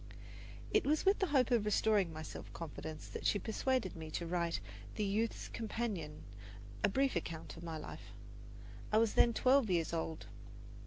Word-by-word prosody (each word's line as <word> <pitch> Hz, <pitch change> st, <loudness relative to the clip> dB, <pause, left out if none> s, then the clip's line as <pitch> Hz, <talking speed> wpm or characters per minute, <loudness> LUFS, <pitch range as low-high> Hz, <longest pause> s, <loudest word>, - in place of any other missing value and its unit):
It -, -, +5 dB
was 300 Hz, +5 st, +1 dB
with 390 Hz, +2 st, +5 dB
the 385 Hz, -, +2 dB
hope 265 Hz, -5 st, +3 dB
of 235 Hz, -3 st, +4 dB
restoring 210 Hz, -3 st, +3 dB
my 155 Hz, 0 st, -6 dB
self -, -, -8 dB
confidence 155 Hz, -1 st, -6 dB
that -, -, -6 dB
she -, -, +3 dB
persuaded 220 Hz, 0 st, 0 dB
me 160 Hz, -1 st, -7 dB
to 170 Hz, +2 st, -3 dB
write 170 Hz, -1 st, 0 dB
for -, -, -3 dB, 0.4 s
the 210 Hz, -, +1 dB
Youth's 215 Hz, +3 st, -1 dB
Companion 210 Hz, -9 st, -3 dB, 0.6 s
a 210 Hz, -, +5 dB
brief 270 Hz, +4 st, +2 dB
account 165 Hz, -1 st, -4 dB
of 165 Hz, -, -10 dB
my 165 Hz, -2 st, -4 dB
life. -, -, -8 dB, 0.8 s
I 215 Hz, -, +4 dB
was 225 Hz, -1 st, +4 dB
then 235 Hz, -, +6 dB
twelve 255 Hz, 0 st, +4 dB
years 170 Hz, -2 st, +1 dB
old. 160 Hz, -1 st, -3 dB
205 Hz, 175 wpm, -36 LUFS, 165-235 Hz, 0.8 s, then